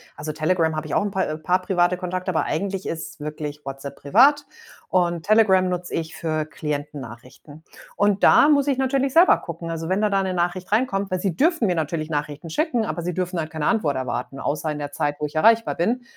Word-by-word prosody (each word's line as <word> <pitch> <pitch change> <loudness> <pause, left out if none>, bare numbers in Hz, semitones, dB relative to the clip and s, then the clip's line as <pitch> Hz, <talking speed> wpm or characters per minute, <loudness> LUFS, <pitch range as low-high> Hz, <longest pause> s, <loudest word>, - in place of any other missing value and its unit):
Also, 155 +1 -5
Telegram, 160 +1 +1
habe 155 0 -3
ich 155 - -6
auch 205 - +1
paar, 190 -1 -1
äh 155 - -4
paar 180 +4 +1
private 180 -1 +1
Kontakte, 185 0 -4
aber 170 - +1
eigentlich 195 +3 -3
ist 160 -1 -6
wirklich 150 -1 -6
WhatsApp 135 +1 -7
privat. 275 - +4 0.4
Und 175 -2 0
Telegram 200 -4 +4
nutze 180 -1 -3
ich 165 0 -4
für 155 -2 -2
Klienten-Nachrichten. 145 -1 -7 0.3
Und 205 -1 +1
da 295 - +7
muss 285 -1 +3
ich 275 - +1
natürlich 265 0 0
selber 340 +4 +6
gucken. 170 0 -7
Also, 165 0 -4
wenn 190 +2 +1
dann 210 -1 +1
da 195 0 +2
'ne 185 -1 -2
Nachricht 175 +2 -2
reinkommt 200 -4 +1
weil 185 - -1
sie 180 -3 -1
dürfen 325 - +2
mir 185 - +2
natürlich 155 0 -3
Nachrichten 150 +2 -4
schicken, 245 - 0
aber 175 - -3
sie 175 0 -3
dürfen 180 -1 -2
halt 155 -1 -3
keine 155 -2 -4
Antwort 185 - +1
erwarten, 130 +1 -4
außer 150 +2 -2
in 150 - -4
der 145 -1 -5
Zeit, 145 0 -1
wo 150 - -1
ich 150 - -7
erreichbar 225 +8 +4
bin. 235 +9 -1
175 Hz, 215 wpm, -23 LUFS, 155-200 Hz, 0.4 s, da